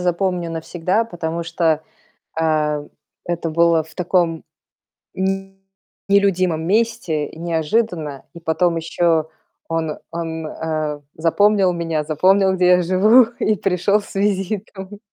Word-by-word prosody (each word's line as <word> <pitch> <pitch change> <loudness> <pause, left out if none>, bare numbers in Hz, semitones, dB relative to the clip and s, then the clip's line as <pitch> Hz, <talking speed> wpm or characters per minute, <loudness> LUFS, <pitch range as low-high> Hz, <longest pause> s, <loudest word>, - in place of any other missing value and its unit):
запомню 180 -1 -1
навсегда, 175 +6 -1
потому 170 -4 -4
что, 165 -2 0 0.6
э, 150 -2 0 0.4
это 170 -1 -2
было 170 0 +3
в 160 +1 -17
таком 170 -2 0 0.7
м, 195 0 -2 0.5
нелюдимом 185 -5 +2
месте 190 -8 0
и - - -13
неожиданно. 165 - -1
И 170 - -10
потом 165 +1 +1
ещё 165 -1 +1 0.4
он 160 -2 -2
он, 165 -1 -4
э, 155 -2 -3
запомнил 195 +4 +3
меня, 165 -3 -2
запомнил, 190 +6 +3
где 180 -1 +2
я 180 0 +5
живу, 210 +8 +5
и 215 - +2
пришёл 195 +2 +1
с 205 - -13
визитом. 195 0 -2
170 Hz, 120 wpm, -20 LUFS, 160-195 Hz, 0.7 s, я